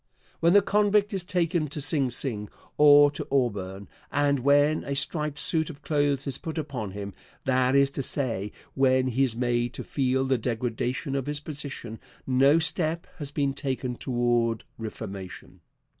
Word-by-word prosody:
When 170 +1 +4
the 205 -1 +6
convict 205 +1 +2
is 190 -2 -2
taken 170 -3 0
to 145 +2 -4
Sing 145 -2 0
Sing 115 -4 -4 0.3
or 145 -1 +7
to 145 - -6
Auburn, 100 -7 -1 0.2
and 145 -1 +2
when 145 +3 +3
a 140 - -3
striped 150 +1 -1
suit 160 -1 +1
of 150 -2 -11
clothes 145 -3 +1
is 135 -2 -3
put 160 0 -6
upon 135 -9 -4
him 100 -1 -6 0.3
that 130 0 +2
is 140 0 +4
to 140 - -3
say, 115 -8 -2 0.2
when 130 -1 +3
he 130 +3 +1
is 125 -4 0
made 120 0 0
to - - -5
feel 130 -1 0
the 130 -2 +1
degradation 125 +3 -2
of 135 -1 -2
his 145 0 -2
position 140 -6 -7 0.3
no 135 +4 +4
step 165 0 0
has 145 -2 -3
been 140 -2 0
taken 130 -3 -3
toward 120 -2 0 0.2
reformation. 100 -4 -8
135 Hz, 165 wpm, -27 LUFS, 120-150 Hz, 0.3 s, or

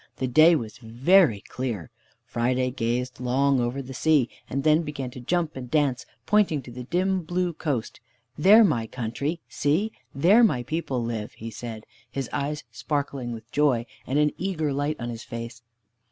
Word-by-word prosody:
The 130 - -2
day 155 +7 +6
was 115 -3 -5
very 125 - +3
clear. 115 - -5 0.3
Friday 125 +2 0
gazed 125 +1 -2
long 130 +2 +2
over 125 +3 -1
the 130 +1 -8
sea, 145 -2 +3 0.2
and 135 +1 -2
then 155 +1 +4
began 140 -5 -5
to 125 - -9
jump 165 +5 -1
and 125 -2 -7
dance, 140 -3 +1 0.2
pointing 185 -7 +2
to 125 - -10
the 125 +1 -7
dim 185 +5 +1
blue 175 +1 -1
coast. 145 -8 -3 0.4
"There 205 +9 +7
my 120 - +1
country! 140 +8 -3
See! 170 +10 0 0.2
There 190 - +6
my 125 - +3
people 130 -3 -2
live!" 115 -2 -4
he 115 +1 -8
said, 110 -2 -7 0.2
his 135 -3 -4
eyes 145 +1 -2
sparkling 135 +1 -3
with 115 +1 -9
joy, 135 -6 +2 0.2
and 135 - 0
an 150 0 +3
eager 160 -6 -1
light 145 +2 -1
on 120 0 -4
his 115 0 -7
face. 115 -1 -7
135 Hz, 170 wpm, -25 LUFS, 120-155 Hz, 0.4 s, There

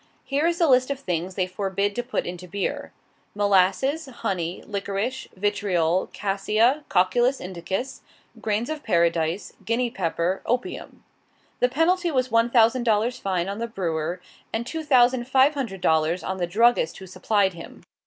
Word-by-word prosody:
Here 285 +4 0
is 340 0 0
the 335 - +3
list 255 -1 +4
of 280 -1 -2
things 180 -5 -3
they 185 - +1
forbid 200 +1 -2
to 245 - 0
put 245 +2 -3
into 180 +1 -7
beer: 195 +2 -3 0.4
"molasses, 205 - +2
honey, 190 -9 -3
liquorice, 200 +5 -3
vitriol, 185 -3 0
quassia, 215 +8 +1
cocculus 240 +9 +2
indicus, 190 +7 -5 0.4
grains 220 +5 -1
of 310 -1 -4
paradise, 170 - 0
Guinea 235 +1 0
pepper, 180 -1 -1
opium." 245 +1 -3 0.6
The 250 - +3
penalty 345 +6 +2
was 255 -4 0
one 230 +1 +3
thousand 235 +1 +4
dollars 235 +2 +1
fine 185 -2 -1
on 200 +2 -4
the 235 - -2
brewer, 170 -5 -3 0.3
and 225 +1 -2
two 320 +5 -4
thousand 250 -3 +3
five 265 +3 +4
hundred 235 -10 -4
dollars 160 +1 +2
on 190 - -3
the 175 -2 -1
druggist 210 -3 +2
who 190 - -10
supplied 190 +1 +1
him. 165 -1 -11
205 Hz, 155 wpm, -24 LUFS, 185-250 Hz, 0.6 s, list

